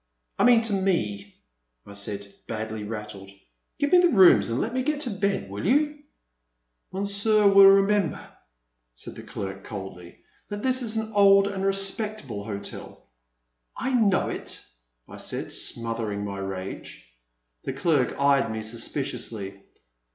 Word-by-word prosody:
I -, -, +4 dB
mean 240 Hz, -2 st, +6 dB
to 225 Hz, -2 st, -2 dB
me," 105 Hz, -, -1 dB, 0.5 s
I 100 Hz, -, -11 dB
said, 100 Hz, 0 st, -6 dB
badly 110 Hz, -1 st, -4 dB
rattled; 105 Hz, -2 st, -7 dB, 0.5 s
give 285 Hz, -, 0 dB
me 360 Hz, -, +7 dB
the 350 Hz, -1 st, +5 dB
rooms 190 Hz, -, +6 dB
and 115 Hz, +2 st, -1 dB
let 230 Hz, -, -2 dB
me 255 Hz, -, 0 dB
get 295 Hz, +2 st, -1 dB
to 250 Hz, -, -2 dB
bed, 200 Hz, 0 st, -1 dB
will 100 Hz, +1 st, -6 dB
you? 295 Hz, -, +2 dB, 0.5 s
" -, -, -52 dB
Monsieur 200 Hz, +2 st, +1 dB
will 195 Hz, 0 st, +8 dB
remember," 195 Hz, -1 st, +4 dB, 0.8 s
said -, -, -8 dB
the -, -, -10 dB
clerk 95 Hz, 0 st, -6 dB
coldly, 95 Hz, -4 st, -8 dB, 0.3 s
that 205 Hz, 0 st, -5 dB
this 255 Hz, 0 st, +2 dB
is 225 Hz, -2 st, -3 dB
an 220 Hz, 0 st, -3 dB
old 200 Hz, -1 st, +6 dB
and 195 Hz, -1 st, -4 dB
respectable 195 Hz, -, -1 dB
hotel." 100 Hz, -, -8 dB, 0.7 s
I 265 Hz, -, -2 dB
know 215 Hz, -6 st, +3 dB
it," -, -, -6 dB, 0.4 s
I -, -, -11 dB
said, -, -, -5 dB
smothering 115 Hz, -3 st, -2 dB
my 100 Hz, -1 st, -5 dB
rage. 95 Hz, -9 st, -6 dB, 0.6 s
The -, -, -3 dB
clerk 140 Hz, -3 st, +1 dB
eyed 140 Hz, -5 st, +3 dB
me 110 Hz, 0 st, -4 dB
suspiciously. 110 Hz, -4 st, -4 dB
150 Hz, 145 wpm, -25 LUFS, -, 0.8 s, will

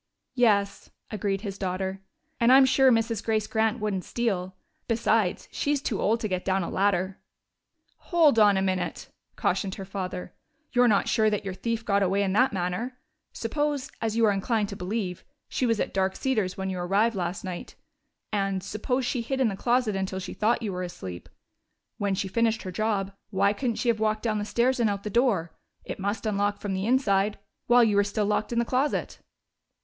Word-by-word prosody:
"Yes," 205 Hz, -5 st, +2 dB, 0.2 s
agreed 200 Hz, -2 st, -1 dB
his 200 Hz, -2 st, -6 dB
daughter. 190 Hz, 0 st, -3 dB, 0.4 s
"And 235 Hz, +1 st, +5 dB
I'm 265 Hz, +1 st, +8 dB
sure 265 Hz, 0 st, +5 dB
Mrs. 225 Hz, -1 st, +1 dB
Grace 220 Hz, -1 st, 0 dB
Grant 220 Hz, +1 st, 0 dB
wouldn't 205 Hz, -4 st, -2 dB
steal. 190 Hz, -6 st, -2 dB, 0.3 s
Besides, 225 Hz, -4 st, +1 dB
she's 290 Hz, 0 st, 0 dB
too 240 Hz, -6 st, -2 dB
old 225 Hz, +2 st, +2 dB
to 215 Hz, -, -1 dB
get 185 Hz, -2 st, -2 dB
down 190 Hz, -1 st, +1 dB
a -, -, -4 dB
ladder." 190 Hz, -1 st, 0 dB, 0.9 s
"Hold 315 Hz, -9 st, +5 dB
on 205 Hz, -2 st, +6 dB
a 190 Hz, -, +1 dB
minute!" 185 Hz, -1 st, -2 dB, 0.3 s
cautioned 190 Hz, -2 st, -1 dB
her 195 Hz, -, -7 dB
father. 185 Hz, -2 st, -5 dB, 0.4 s
"You're 245 Hz, -1 st, +4 dB
not 205 Hz, -3 st, +3 dB
sure 215 Hz, -1 st, +3 dB
that 210 Hz, -1 st, -2 dB
your 195 Hz, -, -3 dB
thief 225 Hz, +4 st, -3 dB
got 200 Hz, -1 st, +2 dB
away 195 Hz, +1 st, +2 dB
in 190 Hz, -1 st, 0 dB
that 255 Hz, +6 st, +4 dB
manner. 195 Hz, +7 st, -3 dB, 0.3 s
Suppose, 290 Hz, +3 st, -2 dB
as 225 Hz, 0 st, -1 dB
you 230 Hz, -, +5 dB
are 210 Hz, -, +4 dB
inclined 205 Hz, +1 st, 0 dB
to 200 Hz, -, -6 dB
believe, 185 Hz, -1 st, -3 dB, 0.2 s
she 255 Hz, -, -1 dB
was 230 Hz, -2 st, +1 dB
at -, -, -2 dB
Dark 190 Hz, 0 st, +1 dB
Cedars 215 Hz, -9 st, -1 dB
when 190 Hz, 0 st, -2 dB
you 185 Hz, -, -4 dB
arrived 200 Hz, +6 st, +2 dB
last 175 Hz, -1 st, -3 dB
night, 185 Hz, -2 st, -6 dB, 0.6 s
and 195 Hz, -2 st, 0 dB
suppose 250 Hz, +6 st, -2 dB
she 245 Hz, -, -1 dB
did 230 Hz, -, -11 dB
hide -, -, -1 dB
in 255 Hz, -, +4 dB
the 195 Hz, -, -4 dB
closet 240 Hz, 0 st, +1 dB
until 190 Hz, 0 st, -2 dB
she 190 Hz, -, -5 dB
thought 230 Hz, +2 st, +1 dB
you 205 Hz, -3 st, -2 dB
were 180 Hz, -, -3 dB
asleep. 95 Hz, -, -7 dB, 0.7 s
When 200 Hz, -1 st, 0 dB
she 195 Hz, -, -2 dB
finished 225 Hz, +3 st, +1 dB
her 185 Hz, -, -5 dB
job, 200 Hz, 0 st, -1 dB, 0.2 s
why 200 Hz, 0 st, +2 dB
couldn't 235 Hz, +1 st, -2 dB
she 245 Hz, -, 0 dB
have 225 Hz, -2 st, +2 dB
walked 215 Hz, 0 st, 0 dB
down 215 Hz, -2 st, 0 dB
the 205 Hz, -, -2 dB
stairs 245 Hz, +4 st, +1 dB
and 230 Hz, -3 st, +3 dB
out 200 Hz, -1 st, -3 dB
the 210 Hz, -, -4 dB
door 205 Hz, -8 st, +1 dB, 0.3 s
it -, -, -6 dB
must 200 Hz, +4 st, -2 dB
unlock 205 Hz, -1 st, 0 dB
from 200 Hz, -2 st, -3 dB
the 190 Hz, +2 st, -2 dB
inside 210 Hz, -5 st, +2 dB, 0.3 s
while 245 Hz, 0 st, +6 dB
you 215 Hz, -3 st, +3 dB
were 205 Hz, -, +5 dB
still 205 Hz, +1 st, -1 dB
locked 210 Hz, +2 st, 0 dB
in 235 Hz, -, -2 dB
the 235 Hz, -, +2 dB
closet?" 265 Hz, +5 st, -1 dB
205 Hz, 205 wpm, -27 LUFS, 190-230 Hz, 0.9 s, I'm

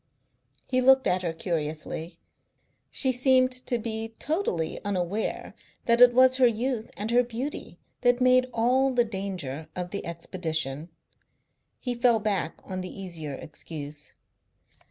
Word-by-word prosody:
He 255 Hz, -1 st, +1 dB
looked 265 Hz, +1 st, +5 dB
at 180 Hz, 0 st, +2 dB
her 170 Hz, -2 st, -1 dB
curiously. 165 Hz, 0 st, -4 dB, 0.7 s
She 260 Hz, -, +4 dB
seemed 255 Hz, 0 st, +3 dB
to 255 Hz, -1 st, -2 dB
be 225 Hz, 0 st, -5 dB
totally 290 Hz, -, -2 dB
unaware 200 Hz, +1 st, -2 dB, 0.3 s
that 235 Hz, +1 st, +3 dB
it 245 Hz, 0 st, +9 dB
was 255 Hz, +1 st, +5 dB
her 255 Hz, -2 st, +6 dB
youth 235 Hz, 0 st, -1 dB
and 210 Hz, +3 st, -2 dB
her 245 Hz, +1 st, +5 dB
beauty 245 Hz, +4 st, -5 dB, 0.2 s
that 245 Hz, 0 st, +3 dB
made 255 Hz, 0 st, +4 dB
all 250 Hz, +4 st, +2 dB
the 245 Hz, -2 st, +2 dB
danger 185 Hz, -, -5 dB
of 180 Hz, 0 st, -4 dB
the 200 Hz, -, -4 dB
expedition. 165 Hz, -3 st, -3 dB, 0.9 s
He 245 Hz, -, -2 dB
fell 240 Hz, -1 st, +3 dB
back 205 Hz, -6 st, -1 dB
on 185 Hz, -1 st, -5 dB
the 185 Hz, -, -6 dB
easier 165 Hz, -7 st, -6 dB
excuse. 150 Hz, 0 st, -7 dB
220 Hz, 135 wpm, -27 LUFS, 170-250 Hz, 0.9 s, it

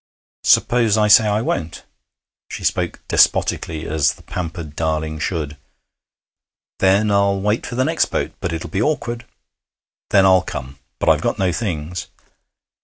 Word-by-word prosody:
'Suppose 115 Hz, -3 st, +3 dB
I 105 Hz, -1 st, +3 dB
say 105 Hz, +1 st, +7 dB
I 105 Hz, +2 st, 0 dB
won't?' 80 Hz, -8 st, -3 dB, 0.7 s
She -, -, -7 dB
spoke -, -, -1 dB
despotically, 80 Hz, -1 st, +1 dB
as 75 Hz, -3 st, +1 dB
the -, -, -18 dB
pampered 85 Hz, -4 st, -6 dB
darling 80 Hz, -1 st, -2 dB
should. 75 Hz, -3 st, -3 dB, 1.2 s
'Then 100 Hz, +3 st, +3 dB
I'll 100 Hz, -1 st, +2 dB
wait 105 Hz, +3 st, -1 dB
for 120 Hz, -, -6 dB
the 130 Hz, +1 st, +1 dB
next 160 Hz, +2 st, +2 dB
boat. -, -, -3 dB
But 90 Hz, -, -3 dB
it'll 80 Hz, 0 st, -5 dB
be 95 Hz, -, -1 dB
awkward.' 120 Hz, -4 st, -2 dB, 0.8 s
'Then 95 Hz, -2 st, +5 dB
I'll 95 Hz, -1 st, +5 dB
come. 65 Hz, -4 st, -7 dB, 0.2 s
But -, -, +1 dB
I've -, -, +4 dB
got -, -, -1 dB
no 95 Hz, -2 st, +1 dB
things.' 85 Hz, -3 st, -4 dB
95 Hz, 150 wpm, -20 LUFS, 80-105 Hz, 1.2 s, say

